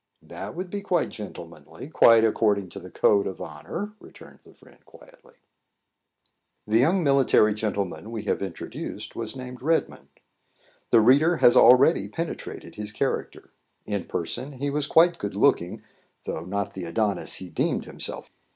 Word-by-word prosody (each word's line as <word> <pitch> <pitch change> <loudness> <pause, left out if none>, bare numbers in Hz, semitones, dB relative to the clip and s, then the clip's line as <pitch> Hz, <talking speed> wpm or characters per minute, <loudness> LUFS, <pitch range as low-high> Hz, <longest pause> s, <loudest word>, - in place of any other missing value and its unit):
"That - - -8
would 180 +1 -6
be 205 - -4
quite 180 -4 0
gentlemanly, 85 - -10
quite 115 -7 +6
according 105 -3 +1
to 100 - -9
the 90 0 -11
code 100 +2 +2
of 95 - -6
honour," 90 - -7
returned - - -15
the - - -19
friend, - - -22
quietly. - - -19 1.3
The 110 +2 +2
young 175 +8 +3
military 135 -6 +4
gentleman 105 -1 -3
we 115 -2 -5
have - - -1
introduced 95 -4 -7
was - - -4
named 125 -1 -8
Redmond. 160 +4 -1 0.8
The 115 - +5
reader 145 +9 +4
has 120 - +5
already 130 +7 +6
penetrated 165 0 -6
his 105 0 -3
character. 105 - -3 0.3
In 100 -4 -3
person 130 - -4
he 140 +2 -3
was 145 0 -1
quite 170 +2 +4
good 100 -1 -4
looking, 100 -6 +1 0.4
though 80 - -5
not 100 +1 -3
the 95 -2 -6
Adonis 100 +2 -1
he 90 -2 -7
deemed 80 - -1
himself. - - -6
110 Hz, 150 wpm, -25 LUFS, 100-140 Hz, 1.3 s, quite